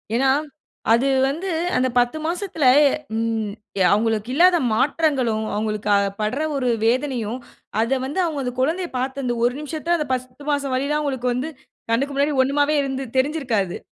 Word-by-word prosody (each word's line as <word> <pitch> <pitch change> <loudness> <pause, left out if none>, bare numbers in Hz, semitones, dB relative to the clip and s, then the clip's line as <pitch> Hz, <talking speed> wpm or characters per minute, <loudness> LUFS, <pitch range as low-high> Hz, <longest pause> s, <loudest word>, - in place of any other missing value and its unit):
ஏன்னா 265 +3 +3 0.6
அது 245 +4 +3 0.2
வந்து, 330 +8 -3 0.3
அந்த 255 +1 +2
10 245 +5 +2
மாசத்தில 345 -1 -3 0.5
ம் 225 -2 -1 0.4
அவுங்களுக்கு 220 +1 +1
இல்லாத 350 +4 +5 0.2
மாற்றங்களும், 260 -4 +1
அவுங்களுக்கு 210 0 -2
அ 200 - +4 0.2
பட்ற 215 +6 -1 0.2
ஒரு 255 -3 0 0.2
வேதனையும், 245 -1 0 0.4
அத 260 +3 +1
வந்து 290 +8 -3
அவுங்க 300 -5 -2
அந்த 250 - -3
குழந்தைய 335 +7 0
பாத்த 265 +2 -3
அந்த 240 -1 0
ஒரு 245 - +2
நிமிசத்த, 315 +3 -2
அந்த 300 -3 -3
10 255 +2 -5
மாசம் 280 -2 -1
வலிலாம் 285 +3 0
அவங்களுக்கு 260 -4 -1
வந்து 260 +6 -3 0.4
கண்ணுக்கு 275 +5 0
முன்னாடி 285 +1 +1
ஒண்ணுமாவே 290 +3 +1
இரு 270 -1 -3
தெரிஞ்சிருக்காது, 260 - 0
265 Hz, 150 wpm, -22 LUFS, 240-295 Hz, 0.6 s, இல்லாத